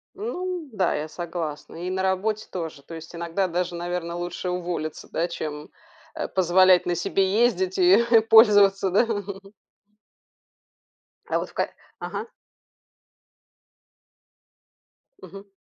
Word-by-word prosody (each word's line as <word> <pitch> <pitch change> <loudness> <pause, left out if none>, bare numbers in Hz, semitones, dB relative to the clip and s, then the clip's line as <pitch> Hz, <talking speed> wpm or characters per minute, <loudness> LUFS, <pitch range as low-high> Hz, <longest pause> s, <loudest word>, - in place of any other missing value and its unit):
Ну 365 - -4
да. 190 -5 0
Я 150 +1 -3
согласна. 165 -3 -6
И - - -2
на 190 0 -2
работе 205 +3 -1
тоже. 160 -6 -6
То 165 - -10
есть 165 +1 -10
иногда 170 +3 -1
даже, 175 0 -2
наверно, 175 0 -4
лучше 175 +1 -4
уволиться, 175 -3 -4
да, 170 +2 0
чем, 150 -3 -6 0.5
э, - - -3
позволять 185 0 +4
на 175 -1 0
себе 190 +2 0
ездить 190 -5 -1
и 180 0 +5 0.2
и - - +8
пользоваться, 205 -3 +5
да? 200 +6 +3 2.2
А - - 0
вот - - -5
в - - -19
ка - - -1 0.3
Ага. 455 - -5 2.9
Мгм. 195 +2 -12
180 Hz, 125 wpm, -24 LUFS, 170-195 Hz, 2.9 s, и